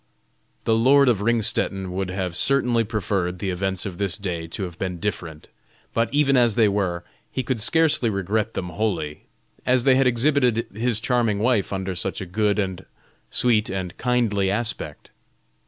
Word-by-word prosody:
The 110 Hz, -, +2 dB
lord 135 Hz, +4 st, +5 dB
of 110 Hz, -5 st, +1 dB
Ringstetten 110 Hz, -4 st, +1 dB
would 95 Hz, 0 st, -3 dB
have 90 Hz, -2 st, -3 dB
certainly 125 Hz, -2 st, +2 dB
preferred 100 Hz, -4 st, -2 dB
the 95 Hz, +1 st, -2 dB
events 95 Hz, +1 st, -2 dB
of 95 Hz, -3 st, -6 dB
this 100 Hz, -1 st, -1 dB
day 85 Hz, -5 st, -4 dB
to 85 Hz, -, -5 dB
have 90 Hz, -2 st, -7 dB
been 90 Hz, -2 st, -3 dB
different; 85 Hz, -5 st, -5 dB, 0.5 s
but 115 Hz, 0 st, 0 dB
even 140 Hz, -1 st, +3 dB
as 120 Hz, -4 st, +3 dB
they 115 Hz, -3 st, +4 dB
were, 95 Hz, -4 st, -1 dB, 0.3 s
he 130 Hz, -, -2 dB
could 120 Hz, -2 st, -1 dB
scarcely 155 Hz, -2 st, +3 dB
regret 105 Hz, +2 st, -1 dB
them 90 Hz, -, -3 dB
wholly, 85 Hz, -5 st, -3 dB, 0.4 s
as 125 Hz, -1 st, +2 dB
they 135 Hz, -, +5 dB
had 130 Hz, 0 st, +3 dB
exhibited 125 Hz, -2 st, +2 dB
his 115 Hz, +1 st, 0 dB
charming 115 Hz, -3 st, +1 dB
wife 110 Hz, -2 st, +1 dB
under 95 Hz, -1 st, -3 dB
such 90 Hz, -, -3 dB
a 95 Hz, -, -5 dB
good 105 Hz, +3 st, 0 dB
and 95 Hz, -3 st, -2 dB, 0.5 s
sweet 115 Hz, -4 st, +2 dB
and 95 Hz, -2 st, -4 dB
kindly 115 Hz, -6 st, +1 dB
aspect. 105 Hz, -8 st, -3 dB
105 Hz, 170 wpm, -23 LUFS, 95-120 Hz, 0.5 s, lord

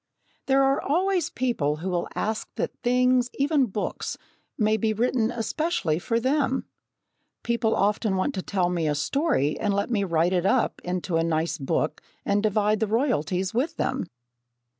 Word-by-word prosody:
There 270 Hz, 0 st, +4 dB
are 270 Hz, 0 st, +2 dB
always 360 Hz, +2 st, +1 dB
people 235 Hz, -, 0 dB
who 170 Hz, +5 st, -4 dB
will 175 Hz, -1 st, -1 dB
ask 215 Hz, +1 st, -2 dB
that -, -, -3 dB
things, 250 Hz, 0 st, +3 dB
even 280 Hz, -1 st, +2 dB
books, 205 Hz, 0 st, -4 dB, 0.4 s
may 215 Hz, -1 st, +3 dB
be 220 Hz, 0 st, 0 dB
written 230 Hz, 0 st, +1 dB
especially 235 Hz, -, -1 dB
for 230 Hz, +5 st, 0 dB
them. 265 Hz, +1 st, +1 dB, 0.8 s
People 235 Hz, -2 st, +1 dB
often 205 Hz, 0 st, +1 dB
want 190 Hz, +10 st, 0 dB
to 190 Hz, -, -3 dB
tell 180 Hz, -2 st, 0 dB
me 170 Hz, -3 st, 0 dB
a 150 Hz, -, +1 dB
story 215 Hz, -, 0 dB
and 205 Hz, -2 st, 0 dB
let 200 Hz, +4 st, -1 dB
me 205 Hz, -4 st, +1 dB
write 170 Hz, 0 st, +1 dB
it 180 Hz, 0 st, +2 dB
up 255 Hz, +1 st, +1 dB
into 180 Hz, -1 st, -1 dB
a 165 Hz, -, +2 dB
nice 165 Hz, 0 st, -1 dB
book 145 Hz, +2 st, -1 dB, 0.2 s
and 205 Hz, 0 st, +2 dB
divide 215 Hz, 0 st, +2 dB
the 220 Hz, -, +1 dB
royalties 195 Hz, -, 0 dB
with 295 Hz, +8 st, -1 dB
them! 260 Hz, -8 st, -1 dB
215 Hz, 165 wpm, -25 LUFS, 180-255 Hz, 0.8 s, There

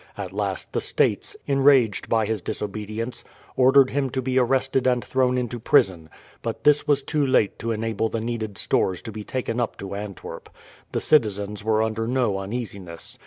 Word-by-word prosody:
At -, -, -6 dB
last -, -, -3 dB
the -, -, 0 dB
States, 410 Hz, -, +1 dB
enraged 135 Hz, -6 st, +3 dB
at 110 Hz, -2 st, +2 dB
his 110 Hz, -3 st, -1 dB
disobedience, 110 Hz, +5 st, -5 dB, 0.3 s
ordered 130 Hz, +1 st, +5 dB
him 135 Hz, -1 st, 0 dB
to 130 Hz, +1 st, -2 dB
be 130 Hz, +1 st, +1 dB
arrested 130 Hz, +1 st, +1 dB
and 125 Hz, -1 st, +1 dB
thrown 130 Hz, -1 st, +1 dB
into 120 Hz, -1 st, -3 dB
prison; 90 Hz, -7 st, +2 dB, 0.3 s
but 115 Hz, -1 st, -5 dB
this 150 Hz, 0 st, +4 dB
was 140 Hz, -2 st, +2 dB
too 150 Hz, 0 st, 0 dB
late 130 Hz, -7 st, +2 dB
to 115 Hz, -, -2 dB
enable 110 Hz, 0 st, -1 dB
the 115 Hz, -, -2 dB
needed 110 Hz, -3 st, -4 dB
stores 90 Hz, -2 st, 0 dB
to 115 Hz, -, -6 dB
be 105 Hz, 0 st, -7 dB
taken 125 Hz, 0 st, -3 dB
up 120 Hz, -, -2 dB
to 100 Hz, 0 st, -7 dB
Antwerp. 100 Hz, -1 st, -7 dB, 0.4 s
The -, -, -1 dB
citizens 105 Hz, -7 st, +1 dB
were 110 Hz, 0 st, +2 dB
under 110 Hz, 0 st, -2 dB
no 120 Hz, -6 st, +1 dB
uneasiness. 95 Hz, -5 st, -6 dB
115 Hz, 175 wpm, -24 LUFS, 105-130 Hz, 0.4 s, ordered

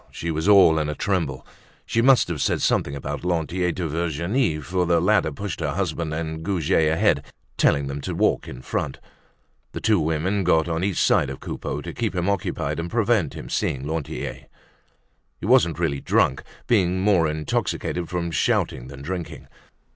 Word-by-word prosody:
She 85 Hz, -, -4 dB
was 80 Hz, +5 st, 0 dB
all 90 Hz, -6 st, +7 dB
in 75 Hz, -1 st, -1 dB
a 75 Hz, -, -3 dB
tremble. 85 Hz, -9 st, -1 dB, 0.4 s
She 115 Hz, -, +1 dB
must 130 Hz, +1 st, +5 dB
have 85 Hz, -5 st, -3 dB
said -, -, +1 dB
something 70 Hz, -, +1 dB
about 70 Hz, -, -5 dB
Lantier 90 Hz, +1 st, 0 dB
to 85 Hz, -1 st, -3 dB
Virginie, 85 Hz, -, 0 dB
for 90 Hz, +3 st, -1 dB
the 85 Hz, -1 st, +3 dB
latter 80 Hz, -, +2 dB
pushed 100 Hz, +5 st, -5 dB
her 75 Hz, -4 st, -1 dB
husband 85 Hz, -4 st, -2 dB
and 80 Hz, 0 st, -4 dB
Goujet 80 Hz, -3 st, +1 dB
ahead, 80 Hz, -, +2 dB, 0.3 s
telling 70 Hz, -1 st, +3 dB
them 70 Hz, +1 st, -5 dB
to -, -, -4 dB
walk -, -, +1 dB
in 65 Hz, -1 st, -9 dB
front. 70 Hz, -3 st, -3 dB, 0.8 s
The -, -, -4 dB
two 105 Hz, -4 st, +3 dB
women 80 Hz, +6 st, 0 dB
got 80 Hz, -2 st, +3 dB
on 80 Hz, +1 st, -1 dB
each 100 Hz, -2 st, -1 dB
side -, -, +3 dB
of 70 Hz, -, -7 dB
Coupeau 75 Hz, -, -5 dB
to -, -, -7 dB
keep -, -, -2 dB
him 90 Hz, 0 st, -1 dB
occupied 100 Hz, -4 st, -1 dB
and 85 Hz, +1 st, -3 dB
prevent 110 Hz, -, +1 dB
him -, -, -8 dB
seeing 65 Hz, 0 st, -1 dB
Lantier. 80 Hz, -1 st, -4 dB, 0.9 s
He -, -, -6 dB
wasn't 115 Hz, -8 st, +4 dB
really 80 Hz, -5 st, 0 dB
drunk, 65 Hz, -, +2 dB, 0.2 s
being 95 Hz, -5 st, +2 dB
more 95 Hz, -5 st, +3 dB
intoxicated 80 Hz, +2 st, -2 dB
from 85 Hz, -1 st, -2 dB
shouting 65 Hz, -5 st, 0 dB
than 70 Hz, 0 st, -10 dB
from -, -, -9 dB
drinking. 90 Hz, -1 st, -5 dB
85 Hz, 180 wpm, -23 LUFS, 75-95 Hz, 0.9 s, all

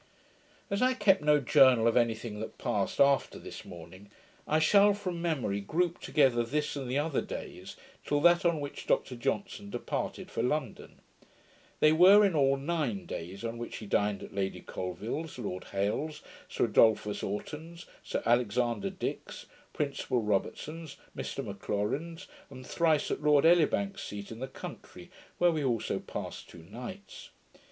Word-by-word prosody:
As 200 Hz, -, 0 dB
I 255 Hz, 0 st, +3 dB
kept 200 Hz, -5 st, +4 dB
no 150 Hz, 0 st, +4 dB
journal 130 Hz, -4 st, +5 dB
of 115 Hz, -, +2 dB
any 115 Hz, -2 st, +3 dB
thing 110 Hz, -2 st, -7 dB
that 110 Hz, -, -7 dB
passed -, -, -2 dB
after 140 Hz, -1 st, +3 dB
this -, -, -9 dB
morning, 90 Hz, +4 st, -12 dB, 0.4 s
I 155 Hz, -, +2 dB
shall, 200 Hz, +5 st, +5 dB
from 185 Hz, -4 st, -4 dB
memory, 135 Hz, -12 st, -1 dB
group 170 Hz, -, -1 dB
together 130 Hz, -5 st, +3 dB
this 150 Hz, +6 st, -2 dB
and 135 Hz, -3 st, -5 dB
the 130 Hz, -, 0 dB
other 150 Hz, -1 st, 0 dB
days, -, -, -8 dB, 0.3 s
till 145 Hz, -, 0 dB
that 175 Hz, +1 st, +5 dB
on 170 Hz, -3 st, +2 dB
which 145 Hz, -1 st, -7 dB
Dr 125 Hz, -, +1 dB
Johnson 195 Hz, +11 st, -3 dB
departed 120 Hz, -, -4 dB
for -, -, -2 dB
London. 125 Hz, -1 st, -3 dB, 0.8 s
They 155 Hz, -, +6 dB
were 190 Hz, +6 st, +7 dB
in 195 Hz, -, +1 dB
all 135 Hz, -2 st, +3 dB
nine 140 Hz, -, -2 dB
days; 90 Hz, +6 st, -7 dB
on 115 Hz, 0 st, -4 dB
which 120 Hz, -, -6 dB
he 110 Hz, -, -8 dB
dined 105 Hz, -1 st, 0 dB
at -, -, -10 dB
Lady 95 Hz, -1 st, -2 dB
Colvill's, 105 Hz, -, -5 dB
Lord 95 Hz, -6 st, -5 dB
Hailes's, 145 Hz, +11 st, -2 dB, 0.3 s
Sir -, -, +1 dB
Adolphus 110 Hz, -2 st, +3 dB
Oughton's, 160 Hz, -, -6 dB, 0.2 s
Sir -, -, -3 dB
Alexander 120 Hz, -1 st, +1 dB
Dick's, -, -, -5 dB, 0.3 s
Principal 135 Hz, -4 st, -1 dB
Robertson's, 150 Hz, +10 st, -3 dB, 0.2 s
Mr -, -, -4 dB
McLaurin's, 105 Hz, -, -3 dB, 0.2 s
and 130 Hz, -2 st, -11 dB
thrice 160 Hz, -1 st, +1 dB
at -, -, -2 dB
Lord 150 Hz, -1 st, +4 dB
Elibank's 175 Hz, +4 st, +3 dB
seat 100 Hz, +1 st, -7 dB
in 115 Hz, -, -8 dB
the 130 Hz, -, -4 dB
country, 130 Hz, -, -10 dB, 0.3 s
where 175 Hz, 0 st, +4 dB
we 155 Hz, -3 st, -1 dB
also 120 Hz, -5 st, -1 dB
passed -, -, -7 dB
two 85 Hz, -, -13 dB
nights. 125 Hz, -, -9 dB
135 Hz, 160 wpm, -30 LUFS, 110-165 Hz, 0.8 s, were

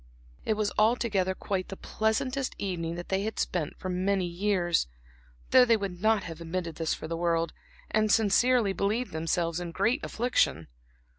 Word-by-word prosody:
It 220 Hz, -, +1 dB
was 210 Hz, -1 st, 0 dB
altogether 215 Hz, -4 st, +2 dB
quite 185 Hz, -1 st, -3 dB
the 195 Hz, -, -7 dB
pleasantest 255 Hz, +5 st, -1 dB
evening 170 Hz, -4 st, -3 dB
that 175 Hz, 0 st, -7 dB
they 190 Hz, 0 st, +1 dB
had 220 Hz, +1 st, -3 dB
spent 165 Hz, -5 st, -2 dB
for -, -, -6 dB
many 185 Hz, +1 st, 0 dB
years, 175 Hz, -, +1 dB, 0.6 s
though 255 Hz, -, +8 dB
they 235 Hz, -2 st, +4 dB
would 190 Hz, -4 st, -5 dB
not 220 Hz, -2 st, +3 dB
have 165 Hz, 0 st, -8 dB
admitted 170 Hz, -1 st, -4 dB
this 165 Hz, -1 st, 0 dB
for -, -, -7 dB
the 165 Hz, -, -3 dB
world, 165 Hz, 0 st, 0 dB, 0.4 s
and 215 Hz, -1 st, +2 dB
sincerely 225 Hz, 0 st, +3 dB
believed 215 Hz, +6 st, -1 dB
themselves 165 Hz, +1 st, -1 dB
in 175 Hz, -1 st, -5 dB
great 225 Hz, -, +1 dB
affliction. 220 Hz, -, 0 dB
195 Hz, 165 wpm, -28 LUFS, 170-220 Hz, 0.6 s, though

